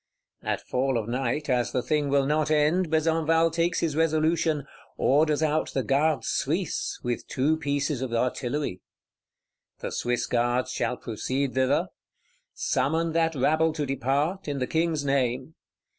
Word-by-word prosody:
At - - -2
fall 130 0 0
of 110 -2 -3
night, 130 +4 -1
as 125 -3 +1
the 125 - 0
thing 150 -2 0
will 140 0 +3
not 150 +1 +1
end, 155 +4 +2
Besenval 160 +1 +2
takes 165 +1 0
his 160 -3 0
resolution: 160 -1 +1 0.3
orders 150 +2 +3
out 155 0 0
the 135 - +1
Gardes 150 +3 +1
Suisses 200 - -1
with 120 - -3
two 145 +3 +1
pieces 145 -3 -1
of 130 -2 -3
artillery. 125 -2 -1 1.0
The - - -5
Swiss 120 0 -1
Guards 120 +1 0
shall 125 0 -1
proceed 130 +4 -2
thither; 130 0 +1 0.7
summon 165 +3 0
that 165 0 +1
rabble 155 +4 +2
to 150 -2 -2
depart, 140 +7 -1
in 145 -1 -2
the 130 - 0
King's 160 -1 0
name. 130 +1 0
145 Hz, 145 wpm, -26 LUFS, 130-160 Hz, 1.0 s, will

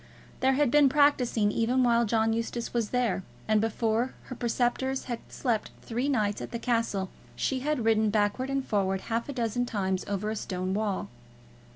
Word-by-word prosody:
There 265 +1 +3
had 280 -2 +2
been 290 -1 +6
practising 255 -7 +3
even 245 +4 +2
while 235 -1 +4
John 225 +1 +2
Eustace 230 +1 -3
was 230 -3 0
there, 245 -7 +1 0.3
and 215 -1 +3
before 225 +2 0
her 255 - -8
preceptors 245 +2 0
had 240 -2 -4
slept 235 -5 -1
three 245 +5 -1
nights 210 -6 0
at - - -5
the 235 - -4
castle, 230 -6 -1 0.2
she 265 - 0
had 285 -3 -1
ridden 220 -1 +3
backwards 210 +5 0
and 275 -1 -1
forwards 195 -2 0
half 230 +3 -2
a - - -3
dozen 245 0 -1
times 190 -4 -1
over 205 +1 -2
a - - -2
stone 185 -2 -3
wall. 205 -1 -1
230 Hz, 180 wpm, -28 LUFS, 210-255 Hz, 0.3 s, been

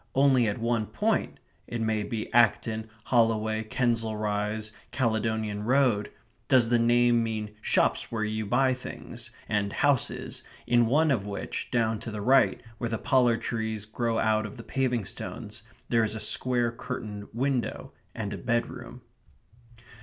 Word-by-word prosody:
Only 135 -3 +4
at 105 - -1
one 115 -2 0
point - - 0 0.3
it 120 - -4
may 110 -1 0
be 110 +1 -4
Acton, 110 -1 +2
Holloway, 110 -2 +2
Kensal 115 -1 0
Rise, 105 +1 -2 0.2
Caledonian 110 -3 0
Road 125 -4 +2 0.4
does 125 -3 +4
the 120 -1 +4
name 120 0 +4
mean 110 -2 -3
shops - - +1
where 110 -2 -1
you 110 0 -2
buy 130 +4 +3
things, 125 - -8 0.2
and 105 -1 0
houses, 145 0 0 0.2
in 120 -1 +4
one 150 +5 +3
of 105 -6 0
which, 100 - -4
down 115 -3 +1
to 115 - -6
the 105 -1 -5
right, 130 +4 +4 0.2
where 120 - -2
the 110 - -1
pollard 125 -4 +2
trees 110 -2 -2
grow 115 +1 -1
out 110 -1 +2
of 105 - -11
the 115 - -8
paving 125 -5 -1
stones, - - -7 0.3
there 115 -1 +3
is 110 0 0
a - - -4
square 120 0 +2
curtained 110 -4 -6
window, 130 +1 -2 0.2
and 105 -3 -3
a 100 - -5
bedroom. 120 +4 -3
115 Hz, 155 wpm, -28 LUFS, 110-120 Hz, 0.4 s, Only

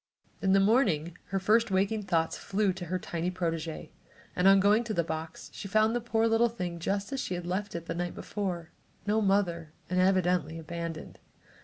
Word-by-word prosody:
In 190 -1 +3
the 195 - +6
morning 195 - +2
her 195 - -2
first 220 +5 +3
waking 200 +3 +1
thoughts 165 -5 0
flew 200 -1 0
to 180 -1 -7
her 185 +2 -1
tiny 170 -1 -3
protégée 165 -3 -3 0.4
and 180 +1 +3
on 195 0 +7
going 205 +4 +4
to 220 -2 -3
the 170 - +2
box 160 0 -6
she 200 - -7
found 215 +3 +3
the 240 - 0
poor 225 -1 +1
little 225 +1 +3
thing 180 -7 -5
just 200 +8 -2
as 270 - -2
she 185 - -2
had 175 -1 -5
left 190 +3 -3
it 170 -1 -5
the - - -3
night 175 0 -3
before 180 -5 -4 0.3
no 215 +2 +2
mother, 175 -6 +1 0.2
and 185 - +2
evidently 180 -4 +2
abandoned. 165 0 -6
185 Hz, 195 wpm, -29 LUFS, 170-205 Hz, 0.4 s, on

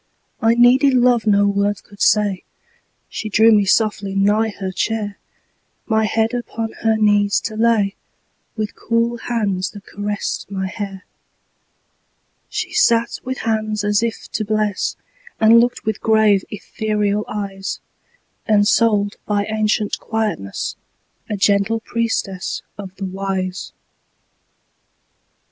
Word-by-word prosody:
I 225 +1 +4
needed 255 +3 +5
love 245 -2 +3
no 205 -1 +4
words 200 0 0
could 200 -1 -17
say; 205 -3 +3 0.7
She 215 - -5
drew 220 +2 +5
me 205 -2 +4
softly 200 -1 +1
nigh 210 +3 +2
her 195 -2 -5
chair, 205 +2 -2 0.7
My 220 -1 +2
head 225 +2 0
upon 230 -2 -4
her 220 -1 +2
knees 205 -1 +3
to 220 - -5
lay, 220 -3 +2 0.6
With 215 0 -3
cool 230 +1 0
hands 205 -6 -1
that 205 -1 -12
caressed 205 -1 -4
my 190 -1 -3
hair. 195 -1 -6 1.4
She - - -4
sat 230 0 +2
with 260 +1 -4
hands 215 -1 -1
as 205 +1 +2
if 230 -1 -3
to 215 - -2
bless, 215 -2 -1 0.4
And 225 +1 +7
looked 245 +1 0
with 220 -1 -2
grave, 215 -3 +3
ethereal 210 0 -2
eyes; 195 -2 -4 0.7
Ensouled 205 0 +3
by 205 -1 +1
ancient 215 -1 0
quietness, 215 - -3 0.5
A 210 - -2
gentle 200 +3 +2
priestess 225 -5 -2
of 200 -2 -7
the 195 - -5
Wise. 190 -1 -3
210 Hz, 120 wpm, -19 LUFS, 200-225 Hz, 1.4 s, And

